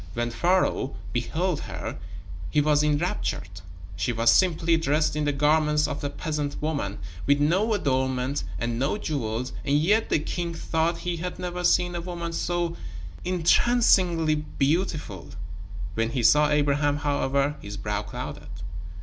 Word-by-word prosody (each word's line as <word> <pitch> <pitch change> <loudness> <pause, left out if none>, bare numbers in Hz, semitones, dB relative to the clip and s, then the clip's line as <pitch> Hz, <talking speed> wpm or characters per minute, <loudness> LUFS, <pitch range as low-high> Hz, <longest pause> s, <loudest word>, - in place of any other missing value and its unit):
When 120 0 -1
Pharaoh 175 -3 +1 0.2
beheld 165 +7 -1
her, - - -6 0.5
he 150 - +2
was 150 0 +3
enraptured. 145 - -1 0.3
She 100 +5 -1
was 115 0 +4
simply 170 -2 +3
dressed 155 -1 +1
in 150 -1 0
the 145 - +2
garments 150 +1 +2
of 145 - -5
a 145 - -1
peasant 145 -1 -3
woman, 140 -10 -2 0.3
with 140 0 +4
no 185 +10 +2
adornment 130 -3 0
and 115 0 -2
no 140 +9 0
jewels, 125 - -3
and 140 +1 +2
yet 205 +9 +2
the - - +3
king 170 +2 -3
thought 165 +1 0
he 175 -1 -1
had 180 +2 -4
never 180 0 -4
seen 175 0 +3
a 175 - -3
woman 170 -1 -5
so 175 0 -1 0.5
entrancingly 180 -2 +3
beautiful. 150 - -1 0.6
When 115 +3 0
he 120 0 -2
saw 150 +6 +5
Abraham, 145 0 +2
however, 145 0 0
his 100 0 -7
brow 105 0 -2
clouded. - - -7
150 Hz, 145 wpm, -26 LUFS, 135-170 Hz, 0.6 s, saw